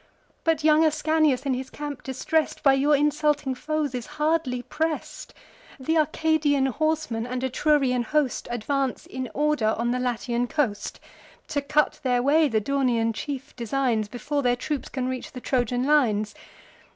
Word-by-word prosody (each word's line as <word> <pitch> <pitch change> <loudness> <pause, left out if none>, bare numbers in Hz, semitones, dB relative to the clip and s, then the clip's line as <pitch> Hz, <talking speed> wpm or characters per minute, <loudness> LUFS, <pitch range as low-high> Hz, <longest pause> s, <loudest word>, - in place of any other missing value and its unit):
But 325 -2 +1
young 310 +1 +5
Ascanius, 310 -3 +2
in 270 - +1
his 260 +1 -4
camp 290 -2 -6
distress'd, 295 +4 -1
By 275 - +6
your 285 +2 +3
insulting 295 -1 +1
foes 300 +1 -2
is 245 -2 -4
hardly 300 -5 0
press'd. 320 +2 -3 0.5
Th' 265 +4 -2
Arcadian 310 -2 +2
horsemen, 295 -4 -1
and 250 +1 -3
Etrurian 260 -2 +2
host, 295 -1 0
Advance 260 +3 -2
in 260 -1 -5
order 295 -7 +1
on 235 +1 0
the 250 - 0
Latian 245 0 -1
coast: 245 -9 -2 0.5
To 285 - 0
cut 300 +1 +1
their 250 -2 +1
way 305 +3 +4
the 225 -5 +1
Daunian 235 -2 +1
chief 275 +2 -6
designs, 235 -2 0
Before 270 +6 -2
their 245 -2 +2
troops 285 +3 -4
can 255 -2 -3
reach 255 -1 -5
the 255 - -6
Trojan 245 -1 0
lines. 220 -8 +2
270 Hz, 150 wpm, -25 LUFS, 245-300 Hz, 0.5 s, By